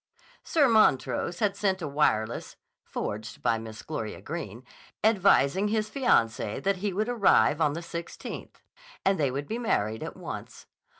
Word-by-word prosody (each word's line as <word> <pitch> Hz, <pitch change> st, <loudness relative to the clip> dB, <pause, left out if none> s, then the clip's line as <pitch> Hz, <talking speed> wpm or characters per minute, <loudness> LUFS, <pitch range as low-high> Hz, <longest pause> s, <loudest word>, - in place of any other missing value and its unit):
Sir 300 Hz, -4 st, +3 dB
Montrose 180 Hz, -, +3 dB
had 205 Hz, -2 st, +2 dB
sent 190 Hz, -2 st, 0 dB
a 160 Hz, -, -4 dB
wireless 120 Hz, -6 st, 0 dB, 0.3 s
(forged 110 Hz, +1 st, -5 dB
by 115 Hz, -2 st, +2 dB
Miss 110 Hz, -1 st, -9 dB
Gloria 115 Hz, -9 st, -5 dB
Greene) 130 Hz, -, -6 dB, 0.4 s
advising 200 Hz, -4 st, +4 dB
his 215 Hz, 0 st, 0 dB
fiancee 115 Hz, -, +1 dB
that 195 Hz, 0 st, 0 dB
he 200 Hz, +2 st, -2 dB
would 210 Hz, +4 st, -1 dB
arrive 200 Hz, -9 st, +4 dB
on 150 Hz, -2 st, +3 dB
the 165 Hz, -, -4 dB
16th, 170 Hz, 0 st, -7 dB, 0.5 s
and 195 Hz, -2 st, +3 dB
they 140 Hz, -3 st, +2 dB
would 140 Hz, +3 st, -4 dB
be 230 Hz, -, -3 dB
married 110 Hz, -, 0 dB
at -, -, -6 dB
once. -, -, -8 dB
170 Hz, 155 wpm, -28 LUFS, -, 0.5 s, advising